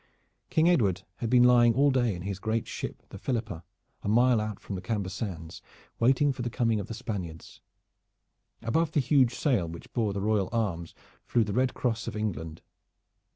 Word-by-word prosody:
King 160 +1 +3
Edward 100 - +2
had 115 - -3
been 125 0 +6
lying 120 -2 +6
all 140 +2 +4
day 120 -6 +1
in 90 - -7
his 100 -1 -4
great 110 +2 -1
ship - - -6
the - - -9
Philippa, 110 -9 -3 0.4
a - - -3
mile 120 +1 +4
out 105 -2 -4
from - - -7
the 95 - -4
Camber 100 0 -2
Sands, 90 -5 -6 0.4
waiting 135 +4 +3
for 130 - -6
the 120 - -2
coming 115 -2 +1
of 100 - -5
the 115 - -6
Spaniards. 95 -9 -6 1.0
Above 155 +8 +1
the - - +3
huge 130 -3 +3
sail 120 - +1
which 85 +1 -10
bore 110 -4 +1
the 100 - -3
royal 105 -2 +1
arms 95 -8 -2 0.3
flew 120 - +2
the 105 -2 -3
red 130 +2 +1
cross 120 -1 -1
of - - -4
England. 80 -7 -4
110 Hz, 190 wpm, -28 LUFS, 95-125 Hz, 1.0 s, been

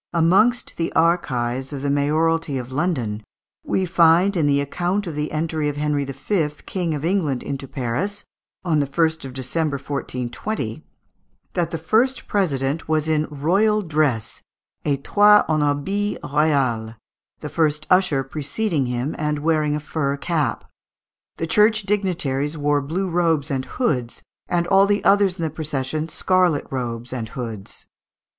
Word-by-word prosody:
Amongst 195 +9 +3
the 165 - -1
archives 130 -6 +1
of 140 -2 -5
the 140 - 0
mayoralty 155 +1 +1
of 125 0 -6
London, 130 -9 -1 0.4
we 190 - 0
find 175 +2 +4
in 160 -4 +2
the 140 0 +3
"account 175 +8 -1
of 170 - -5
the 150 +1 -3
entry 155 -1 -1
of 145 - -5
Henry 150 -1 0
V., 150 +5 -1 0.2
King 175 -4 -2
of 145 +1 -4
England, 165 -8 0
into 135 -1 -5
Paris" 145 - -3 0.4
(on 160 -4 +2
the 140 - +1
1st 160 +1 0
of 130 - -7
December, 140 +4 -2
1420), 140 - -4 0.7
that 175 -3 0
"the 165 - -3
first 230 +10 +1
president 150 -6 -1
was 155 0 +1
in 155 -1 +1
royal 195 +9 +2
dress 150 - 0 0.4
(estoit 205 +9 +4
en 155 -1 +1
habit 190 +9 0
roial), 135 -7 +1 0.5
the 150 - -5
first 150 0 0
usher 180 -7 +3
preceding 145 - -2
him, 125 +4 -2
and 150 -1 0
wearing 155 -1 +1
a - - -1
fur 140 -2 -2
cap; 155 -1 -1 0.7
the 165 - -2
church 210 +5 +3
dignitaries 165 -8 -1
wore 145 0 +1
blue 170 +8 -2
robes 165 -4 +1
and 130 -1 -1
hoods, 125 - -2 0.2
and 170 -1 +1
all 195 +2 +5
the 205 0 +1
others 195 -2 +4
in 165 - -3
the 160 - -1
procession 155 0 -3
scarlet 180 -3 +2
robes 120 -2 -4
and 115 -3 -4
hoods." 115 -5 -7
155 Hz, 150 wpm, -22 LUFS, 140-175 Hz, 0.7 s, all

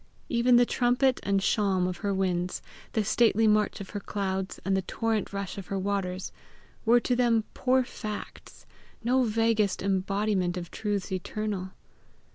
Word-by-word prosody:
Even 240 0 +4
the 240 0 +6
trumpet 250 +2 +2
and 195 0 +1
shawm 190 -3 +2
of 180 -1 -3
her 200 +2 -2
winds, 180 -2 -1 0.3
the 220 - +1
stately 225 +1 +3
march 210 -1 +2
of 195 - -8
her 205 - -3
clouds, 190 -2 -3
and 195 0 +2
the 190 - +1
torrent 225 +3 -1
rush 200 0 -4
of 190 - -9
her 195 - -2
waters, 190 -1 -2 0.5
were 235 +2 +6
to 245 +1 0
them 235 -2 +3
poor 260 0 +2
facts, 215 -3 -8 0.4
no 255 +3 +3
vaguest 225 -4 +1
embodiment 195 -1 0
of 175 -1 -6
truths 205 -3 -2
eternal. 190 +1 -3
205 Hz, 155 wpm, -28 LUFS, 190-225 Hz, 0.5 s, the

